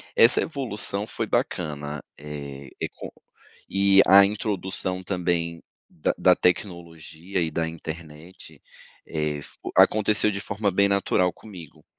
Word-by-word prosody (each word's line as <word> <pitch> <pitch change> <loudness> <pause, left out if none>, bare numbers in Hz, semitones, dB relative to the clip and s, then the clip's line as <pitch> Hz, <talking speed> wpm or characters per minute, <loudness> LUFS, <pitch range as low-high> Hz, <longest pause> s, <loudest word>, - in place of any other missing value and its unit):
Essa 115 - +5
evolução 110 -8 -2
foi - - -4
bacana, 75 -3 -2 0.2
eh, 70 -2 -8
é - - 0
com - - -9 0.6
e 100 0 +5
a 100 +1 +8
introdução 95 -3 -3
também 85 -3 -2 0.3
da 75 - -2
da - - +5
tecnologia 85 -1 -2
e 80 -2 -1
da 80 +1 -1
internet, 80 +1 -9 0.5
eh 75 -2 -3
fo - - -10
aconteceu 105 0 +5
de 100 0 -4
forma 100 -1 -2
bem 100 +2 +3
natural 95 -2 +1
comigo. 90 -6 -13
90 Hz, 125 wpm, -24 LUFS, 80-100 Hz, 0.6 s, a